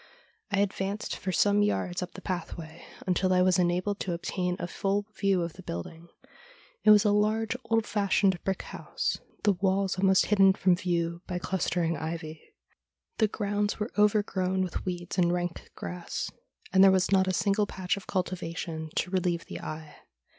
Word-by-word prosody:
I 200 Hz, -2 st, +2 dB
advanced 200 Hz, +1 st, -2 dB
for 185 Hz, -, -3 dB
some 205 Hz, +3 st, +3 dB
yards 185 Hz, -3 st, 0 dB
up 180 Hz, -, -5 dB
the 190 Hz, -, -10 dB
pathway 170 Hz, -3 st, -5 dB, 0.2 s
until 185 Hz, 0 st, +1 dB
I 180 Hz, 0 st, +4 dB
was 185 Hz, -1 st, +3 dB
enabled 180 Hz, +3 st, +1 dB
to 180 Hz, -, -2 dB
obtain 180 Hz, +1 st, -2 dB
a 175 Hz, -, -3 dB
full 200 Hz, +3 st, -1 dB
view 195 Hz, -3 st, +2 dB
of 170 Hz, -1 st, -4 dB
the 185 Hz, -, -11 dB
building. 165 Hz, -, -7 dB, 0.8 s
It -, -, +5 dB
was 210 Hz, 0 st, +7 dB
a 210 Hz, -, +4 dB
large, 215 Hz, +2 st, +1 dB
old 225 Hz, -1 st, +1 dB
fashioned 200 Hz, -3 st, +1 dB
brick 195 Hz, -1 st, -1 dB
house, -, -, -3 dB, 0.2 s
the 205 Hz, -, +4 dB
walls 190 Hz, 0 st, 0 dB
almost 190 Hz, 0 st, +4 dB
hidden 195 Hz, -2 st, +5 dB
from 185 Hz, -2 st, +3 dB
view 170 Hz, -1 st, -1 dB
by 180 Hz, -, -2 dB
clustering 175 Hz, -2 st, -1 dB
ivy. 160 Hz, 0 st, -5 dB, 0.8 s
The 220 Hz, -, +5 dB
grounds 205 Hz, 0 st, -1 dB
were 210 Hz, +2 st, -2 dB
overgrown 200 Hz, -3 st, +2 dB
with 180 Hz, -, -4 dB
weeds 175 Hz, 0 st, -3 dB
and 175 Hz, -1 st, +4 dB
rank 175 Hz, -1 st, -3 dB
grass, 180 Hz, -1 st, -5 dB, 0.4 s
and 190 Hz, 0 st, +7 dB
there 195 Hz, -, +9 dB
was 190 Hz, 0 st, +2 dB
not 190 Hz, -1 st, +4 dB
a -, -, +2 dB
single 205 Hz, +2 st, +1 dB
patch 185 Hz, -2 st, -2 dB
of 200 Hz, -, -10 dB
cultivation 165 Hz, -3 st, -3 dB
to 180 Hz, -, -1 dB
relieve 175 Hz, -3 st, 0 dB
the -, -, -7 dB
eye. 155 Hz, 0 st, -7 dB
185 Hz, 175 wpm, -28 LUFS, 175-200 Hz, 0.8 s, there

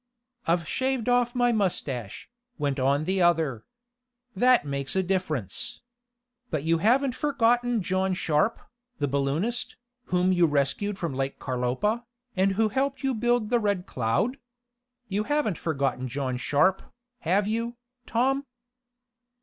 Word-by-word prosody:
"I've 170 Hz, -1 st, +1 dB
shaved 260 Hz, +1 st, -1 dB
off 245 Hz, 0 st, +2 dB
my 245 Hz, -1 st, +3 dB
mustache," 145 Hz, -, -2 dB, 0.3 s
went 140 Hz, -2 st, -1 dB
on 140 Hz, +3 st, +2 dB
the 190 Hz, +3 st, 0 dB
other. 160 Hz, -9 st, +2 dB, 0.7 s
"That 250 Hz, -1 st, +4 dB
makes 140 Hz, +1 st, -2 dB
a 190 Hz, -, +2 dB
difference. 160 Hz, -, -2 dB, 0.7 s
But 155 Hz, -4 st, -2 dB
you 165 Hz, +1 st, +2 dB
haven't 250 Hz, +7 st, +3 dB
forgotten 245 Hz, -5 st, +1 dB
John 185 Hz, +1 st, 0 dB
Sharp, 160 Hz, +6 st, +1 dB, 0.4 s
the 145 Hz, -, 0 dB
balloonist, 140 Hz, -, -1 dB, 0.3 s
whom 180 Hz, +1 st, +2 dB
you 175 Hz, -2 st, +4 dB
rescued 150 Hz, +8 st, 0 dB
from 170 Hz, -7 st, -3 dB
Lake 135 Hz, +1 st, -2 dB
Carlopa, 130 Hz, -, -1 dB, 0.3 s
and 195 Hz, +1 st, +2 dB
who 215 Hz, +2 st, +2 dB
helped 275 Hz, +3 st, -1 dB
you 270 Hz, -1 st, +1 dB
build 240 Hz, -1 st, +1 dB
the 240 Hz, -, +4 dB
Red 200 Hz, -4 st, 0 dB
Cloud? 125 Hz, -, 0 dB, 0.7 s
You 210 Hz, +2 st, -1 dB
haven't 290 Hz, -, 0 dB
forgotten 135 Hz, -5 st, -1 dB
John 130 Hz, 0 st, -2 dB
Sharp, 145 Hz, +9 st, +2 dB, 0.4 s
have 195 Hz, +3 st, +1 dB
you, 230 Hz, +2 st, -2 dB, 0.3 s
Tom?" 270 Hz, +4 st, +1 dB
190 Hz, 135 wpm, -27 LUFS, 145-235 Hz, 0.7 s, That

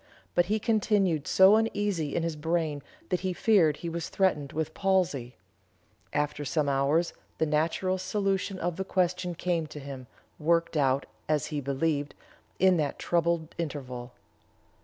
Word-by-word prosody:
But 175 Hz, 0 st, +3 dB
he 215 Hz, +2 st, +1 dB
continued 205 Hz, -, +1 dB
so 190 Hz, +3 st, +7 dB
uneasy 205 Hz, -9 st, -1 dB
in 170 Hz, -, 0 dB
his 165 Hz, -1 st, -2 dB
brain 155 Hz, -1 st, -1 dB, 0.3 s
that 180 Hz, -, +1 dB
he 185 Hz, -1 st, -2 dB
feared 175 Hz, -8 st, +3 dB
he 170 Hz, -, -6 dB
was 165 Hz, 0 st, -4 dB
threatened 150 Hz, -8 st, +1 dB
with 160 Hz, 0 st, -3 dB
palsy. 180 Hz, -11 st, 0 dB, 0.8 s
After 150 Hz, 0 st, -1 dB
some 150 Hz, +1 st, 0 dB
hours 140 Hz, +5 st, +2 dB, 0.2 s
the 160 Hz, -, +2 dB
natural 165 Hz, +5 st, 0 dB
solution 195 Hz, 0 st, -1 dB
of 175 Hz, -2 st, -2 dB
the 190 Hz, -, -1 dB
question 180 Hz, -1 st, 0 dB
came 170 Hz, -2 st, -1 dB
to 150 Hz, 0 st, -9 dB
him, 135 Hz, -2 st, -8 dB, 0.3 s
worked 165 Hz, +2 st, +1 dB
out, 140 Hz, -2 st, +2 dB, 0.2 s
as 155 Hz, -1 st, +2 dB
he 145 Hz, -, -1 dB
believed, 145 Hz, +1 st, -1 dB, 0.4 s
in 185 Hz, -1 st, +4 dB
that 150 Hz, -3 st, -1 dB
troubled 170 Hz, -1 st, 0 dB
interval." 130 Hz, -6 st, -5 dB
165 Hz, 150 wpm, -28 LUFS, 145-185 Hz, 0.8 s, so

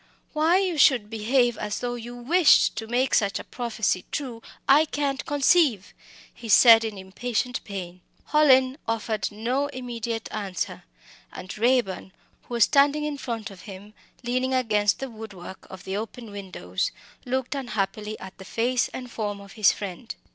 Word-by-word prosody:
"Why 320 Hz, +3 st, +3 dB
you 370 Hz, -5 st, 0 dB
should 240 Hz, -6 st, +4 dB
behave 240 Hz, +2 st, +1 dB
as 210 Hz, 0 st, -3 dB
though 245 Hz, 0 st, -3 dB
you 240 Hz, 0 st, -7 dB
wished 295 Hz, +6 st, +4 dB
to 225 Hz, 0 st, -4 dB
make 250 Hz, +3 st, 0 dB
such 200 Hz, -3 st, +2 dB
a -, -, -6 dB
prophecy 225 Hz, -6 st, -2 dB
true 250 Hz, -6 st, -4 dB, 0.3 s
I 295 Hz, +3 st, +6 dB
can't 285 Hz, -3 st, -2 dB
conceive!" 285 Hz, -, +3 dB, 0.4 s
he 230 Hz, -, -10 dB
said 225 Hz, +1 st, +8 dB
in 220 Hz, -2 st, -4 dB
impatient 240 Hz, +6 st, -3 dB
pain. 185 Hz, -3 st, -7 dB, 0.3 s
Hallin 265 Hz, -2 st, +4 dB
offered 220 Hz, -2 st, -2 dB
no 245 Hz, +7 st, -1 dB
immediate 235 Hz, -4 st, -5 dB
answer, 195 Hz, -, -4 dB, 0.5 s
and 185 Hz, -, -8 dB
Raeburn, 220 Hz, -5 st, 0 dB, 0.3 s
who 240 Hz, -, -5 dB
was 235 Hz, -, +5 dB
standing 285 Hz, +4 st, +3 dB
in 295 Hz, -2 st, -4 dB
front 225 Hz, -4 st, -5 dB
of 190 Hz, -2 st, -13 dB
him, 200 Hz, +2 st, -11 dB, 0.3 s
leaning 255 Hz, +2 st, 0 dB
against 210 Hz, -5 st, +2 dB
the 270 Hz, -, -5 dB
wood 220 Hz, -2 st, -9 dB
work 185 Hz, +1 st, -11 dB
of 190 Hz, -1 st, -10 dB
the 190 Hz, -, -4 dB
open 225 Hz, +1 st, -7 dB
window, 185 Hz, -, -9 dB, 0.5 s
looked 260 Hz, +1 st, -2 dB
unhappily 215 Hz, -5 st, -3 dB
at 190 Hz, 0 st, -10 dB
the -, -, -9 dB
face 245 Hz, +4 st, 0 dB
and 250 Hz, -1 st, -8 dB
form 205 Hz, -3 st, -3 dB
of 200 Hz, 0 st, -13 dB
his 215 Hz, -2 st, +4 dB
friend. 200 Hz, +3 st, -7 dB
230 Hz, 160 wpm, -25 LUFS, 205-260 Hz, 0.5 s, said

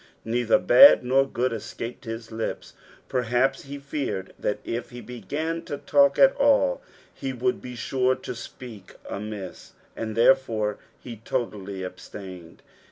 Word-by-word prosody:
Neither 115 Hz, 0 st, +2 dB
bod 280 Hz, -, +8 dB
nor 135 Hz, +2 st, +3 dB
good 125 Hz, -1 st, -1 dB
escaped 115 Hz, +3 st, -7 dB
his 115 Hz, 0 st, -6 dB
Ups. 110 Hz, 0 st, -4 dB, 0.3 s
Perhaps 130 Hz, +2 st, 0 dB
lie 140 Hz, -, -5 dB
feared 140 Hz, -9 st, -4 dB
that 105 Hz, -, -1 dB
if 120 Hz, +1 st, -4 dB
ho 120 Hz, -, -9 dB
began 155 Hz, +7 st, -4 dB
to 145 Hz, -, -5 dB
lalk 280 Hz, 0 st, +6 dB
st 270 Hz, -1 st, +6 dB
all, 290 Hz, -, +3 dB, 0.3 s
he 135 Hz, -1 st, -5 dB
would 125 Hz, 0 st, -1 dB
be 125 Hz, -1 st, -8 dB
sure 130 Hz, +2 st, +1 dB
to -, -, -7 dB
speak 115 Hz, -4 st, -10 dB
amiss, 100 Hz, -2 st, -7 dB, 0.2 s
and, 110 Hz, -1 st, -4 dB
therefore, 115 Hz, -4 st, +3 dB, 0.2 s
he 120 Hz, -3 st, -9 dB
totally 105 Hz, -5 st, -4 dB
abstained. 90 Hz, -1 st, -10 dB
120 Hz, 140 wpm, -25 LUFS, 110-135 Hz, 0.3 s, bod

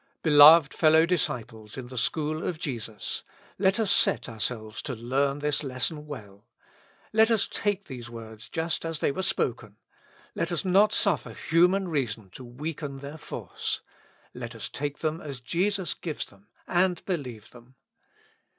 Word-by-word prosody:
Beloved 150 Hz, 0 st, +8 dB
fellow 160 Hz, 0 st, +5 dB
disciples 115 Hz, -, -2 dB
in 130 Hz, -, -5 dB
the 130 Hz, -, -9 dB
school 155 Hz, +6 st, -1 dB
of 175 Hz, -, -2 dB
Jesus! 115 Hz, -8 st, -4 dB, 0.4 s
let 195 Hz, +2 st, +3 dB
us 215 Hz, -3 st, +2 dB
set -, -, +3 dB
ourselves 110 Hz, -1 st, -3 dB
to 130 Hz, -, -4 dB
learn 135 Hz, +5 st, 0 dB
this 150 Hz, 0 st, 0 dB
lesson 150 Hz, +3 st, -1 dB
well. 105 Hz, -9 st, -10 dB, 0.7 s
Let 220 Hz, +1 st, +5 dB
us 225 Hz, -3 st, +2 dB
take 205 Hz, -1 st, -1 dB
these 120 Hz, -2 st, -8 dB
words 110 Hz, -2 st, -10 dB
just 165 Hz, 0 st, -2 dB
as 165 Hz, -1 st, -3 dB
they -, -, +1 dB
were 190 Hz, -, -3 dB
spoken. 115 Hz, -, -1 dB, 0.6 s
Let 170 Hz, -, -2 dB
us 170 Hz, +2 st, -1 dB
not 195 Hz, +3 st, +5 dB
suflfer 200 Hz, -2 st, 0 dB
human 180 Hz, +4 st, +3 dB
reason 115 Hz, -, -2 dB
to 130 Hz, -, -10 dB
weaken 140 Hz, +3 st, -5 dB
their 140 Hz, +3 st, -8 dB
force. -, -, -4 dB, 0.5 s
Let 120 Hz, -1 st, -7 dB
us 115 Hz, -, -4 dB
take 145 Hz, 0 st, -4 dB
them 160 Hz, +1 st, -1 dB
as 140 Hz, -4 st, -6 dB
Jesus 180 Hz, +8 st, 0 dB
gives 160 Hz, -4 st, -4 dB
them, 100 Hz, 0 st, -19 dB, 0.2 s
and 180 Hz, -1 st, +1 dB
believe 125 Hz, -, -4 dB
them. 125 Hz, +1 st, -17 dB
145 Hz, 155 wpm, -27 LUFS, 120-170 Hz, 0.7 s, Beloved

